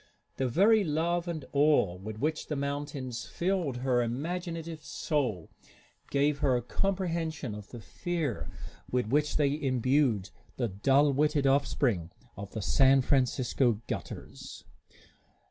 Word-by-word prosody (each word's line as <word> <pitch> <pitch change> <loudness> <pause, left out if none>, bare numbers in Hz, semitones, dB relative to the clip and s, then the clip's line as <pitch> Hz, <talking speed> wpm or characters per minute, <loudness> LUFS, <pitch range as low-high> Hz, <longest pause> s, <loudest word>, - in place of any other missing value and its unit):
The 130 - +1
very 205 - +4
love 170 +2 0
and 160 -5 -4
awe 145 -10 +3
with 105 +4 -7
which 155 +6 -2
the 150 - -2
mountains 140 -3 -4
filled 175 -8 -1
her 125 -1 +1
imaginative 165 +5 -4
soul 140 - -2 0.6
gave 140 +1 +1
her 130 -4 +2
comprehension 165 - -2
of 105 -1 -9
the 120 - -9
fear 160 - -3 0.4
with 125 -4 0
which 150 +1 +2
they 145 0 +1
imbued 130 -6 +1 0.3
the 120 -3 0
dull 135 +9 +3
witted 150 0 +2
offspring 130 - +1 0.3
of 100 0 -7
San 135 +4 +5
Francisco 125 -3 +1
gutters. - - -7
140 Hz, 120 wpm, -30 LUFS, 125-155 Hz, 0.6 s, San